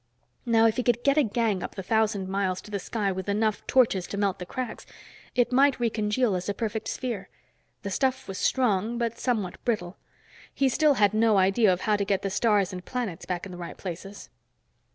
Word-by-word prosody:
Now, 225 -1 +4
if 225 +1 +2
he - - +2
could 240 -1 +1
get 280 +2 +4
a - - +6
gang 225 -5 0
up - - -6
the 190 - -5
thousand 210 -1 +1
miles 190 -1 -1
to 210 - -13
the 200 - -2
sky 205 0 -2
with 190 +1 -4
enough 215 +1 +1
torches 220 -8 +3
to 200 - -5
melt 200 -2 0
the 180 - -7
cracks, 250 0 -5 0.5
it 245 0 +2
might 275 +2 +4
recongeal 220 -1 +1
as 180 +2 -3
a 200 - -1
perfect 220 0 -3
sphere. 225 -7 -4 0.5
The 200 - -4
stuff 260 +4 0
was 195 - -5
strong, 230 -2 +1
but 235 -1 -2
somewhat 215 -8 -2
brittle. 195 -7 -2 0.6
He 270 -1 +3
still 300 +2 +3
had 205 -3 +3
no 220 -1 +3
idea 195 +2 +4
of 180 0 -1
how 210 +1 +2
to 200 - 0
get 195 -1 0
the 195 - -2
stars 205 -3 +2
and 180 -1 -6
planets 225 -9 -4
back 180 0 -3
in 195 - -8
the 180 - -9
right 170 - -7
places. 195 +2 -8
210 Hz, 215 wpm, -27 LUFS, 190-235 Hz, 0.6 s, a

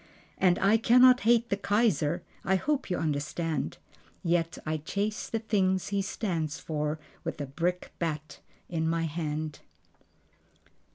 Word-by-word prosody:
And 180 -2 +4
I 205 +3 +4
cannot 250 +2 +6
hate 235 0 +4
the - - +4
Kaiser 195 -6 +1 0.2
(I 190 - +2
hope 280 +6 0
you 180 - 0
understand.) 155 0 -2 0.5
Yet 165 -1 +1
I 155 0 0
chase 200 +8 -3
the 225 - 0
thing 200 -4 +2
he 200 +2 -2
stands 170 -6 -2
for 150 -1 -2 0.3
with - - -4
a 145 - -2
brickbat 155 -1 -3 0.3
in 160 -2 -1
my 165 0 0
hand. 155 -1 -3
175 Hz, 130 wpm, -29 LUFS, 155-205 Hz, 0.5 s, cannot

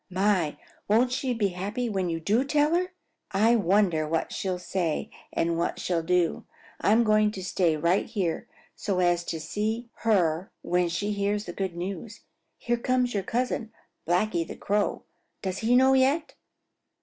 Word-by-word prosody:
My, 185 -4 +1 0.3
won't 235 +4 +3
she 260 0 -1
be 220 -4 +1
happy 200 +7 -3
when 190 -5 -1
you 165 -1 -2
do 210 +10 +2
tell 295 +2 +2
her! 360 +1 +2 0.4
I 215 +4 +4
wonder 185 -6 +2
what 165 +1 -1
she'll 185 -2 -2
say 180 -3 -2 0.2
and 165 0 0
what 170 - -1
she'll 175 -2 0
do. 175 0 +1 0.3
I'm 225 +3 +4
going 215 -1 +4
to 190 - -6
stay 175 -3 +1
right 170 +5 +1
here 190 -8 -2 0.3
so 195 -3 -2
as 175 -1 +2
to 165 - -3
see 220 +8 -3
her 180 -6 +1
when 180 0 +1
she 205 +5 -1
hears 205 +1 -1
the 175 - -6
good 190 -2 -3
news. 195 +5 -6 0.4
Here 240 0 -1
comes 250 0 +1
your 200 - 0
cousin, 230 +1 -2 0.4
Blacky 175 0 +1
the 165 - -8
Crow. 205 0 -1 0.4
Does 190 -2 -2
he 230 +3 +3
know 265 +1 +6
yet?" 270 +4 +2
200 Hz, 165 wpm, -27 LUFS, 175-230 Hz, 0.4 s, know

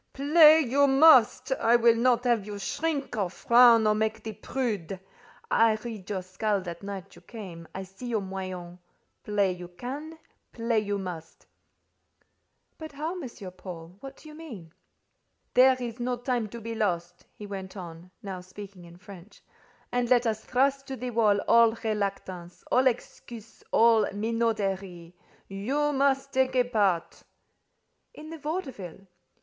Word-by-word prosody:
"Play 305 +3 +6
you 280 +1 +3
must. 270 -4 +5
I 240 -3 +3
will 235 -1 +5
not 240 +1 +2
have 240 -4 +2
you 205 0 -7
shrink, 285 +6 -3
or 200 -4 -1
frown, 235 +3 +5
or 215 - +4
make 220 +1 -2
the 220 - -5
prude. 210 -5 -4 0.5
I 225 -1 +4
read 215 -3 -8
your 190 -3 -3
skull 200 +3 -1
that 170 -2 -8
night 195 -1 -8
you - - -16
came; 180 -8 -10
I 190 - -4
see 195 +6 -10
your 225 -3 -1
moyens: 185 -2 -7 0.4
play 205 -2 +1
you 180 -1 -8
can; 275 - -7 0.4
play 230 -1 0
you 205 -1 -2
must." 180 -4 -8 1.3
"But 315 -2 -8
how, 305 +4 -3
M. 265 - -6 0.3
Paul? 180 -1 -10
What 270 +2 -10
do - - -15
you - - -12
mean?" 230 - -11 0.8
"There 260 +1 +6
is 240 -1 -6
no 245 +1 -1
time 245 -2 -2
to 235 - -8
be 230 +1 -6
lost," 175 -5 -3
he 210 - -9
went 195 -1 -7
on, 170 -1 -9
now 190 -2 -6
speaking 190 0 -11
in 170 0 -14
French; 195 0 -14 0.5
"and 245 -1 0
let 245 -1 +4
us 220 -1 -1
thrust 275 +2 0
to 270 - -5
the 250 -1 -5
wall 215 -3 +3
all 230 -1 +5
reluctance, 195 -5 -4
all 260 +1 +4
excuses, 230 -2 -5
all 225 -2 +5
minauderies. 200 -5 -2 0.3
You 270 +10 -1
must 275 0 +1
take 260 0 +1
a 250 - +4
part." 200 -8 0 0.9
"In 310 +1 -10
the 325 - -8
vaudeville?" 265 - -6
220 Hz, 155 wpm, -27 LUFS, 190-255 Hz, 1.3 s, Play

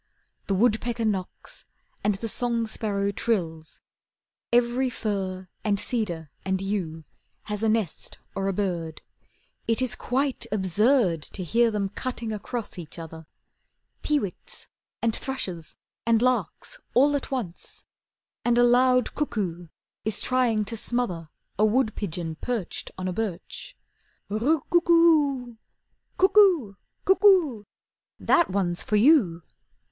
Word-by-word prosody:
The 195 - +1
woodpecker 230 +2 +1
knocks, 195 -4 -4 0.4
And 210 -1 +2
the 225 +4 -4
song 235 +1 0
sparrow 200 -2 -1
trills, 165 -8 -2 0.7
Every 245 +2 +2
fir, 190 -5 -3 0.2
and 205 -2 +1
cedar, 175 - -2
and 190 0 0
yew 185 -5 -3 0.4
Has 210 -1 -4
a 225 - +2
nest 215 -7 -2 0.2
or 195 0 -2
a - - +2
bird, 175 -5 -3 0.6
It 230 0 +2
is 255 -2 +2
quite 270 +2 -1
absurd 205 - +2
To 185 +5 -4
hear 230 +7 +3
them 210 -2 -1
cutting 230 +2 -4
across 215 -1 -5
each 160 -1 -9
other: 160 -1 -9 0.7
Peewits, 285 -12 -2 0.4
and 230 -1 +2
thrushes, 185 - -4 0.3
and 230 -1 +3
larks, 255 - -1 0.2
all 285 +4 +5
at 280 - -3
once, 230 -11 -5 0.6
And 240 0 +2
a 245 - +6
loud 250 +1 +4
cuckoo 190 - -2 0.4
is 215 -2 0
trying 240 -5 +1
to 230 - -3
smother 210 -9 -1 0.3
A - - +4
wood 220 0 +2
pigeon 165 -5 -3
perched 235 -7 -3
on 185 0 -3
a 185 - -2
birch, 215 - -5 0.5
"Roo 255 +9 +1
coo 345 0 +4
oo 305 -7 +4
oo 225 - -19 0.3
" - - -47
"Cuckoo! 375 - +5 0.3
Cuckoo! 365 - +4 0.5
That's 340 - +3
one 185 -2 0
for 195 +4 -2
you!" 210 - +4
220 Hz, 130 wpm, -26 LUFS, 190-250 Hz, 0.7 s, a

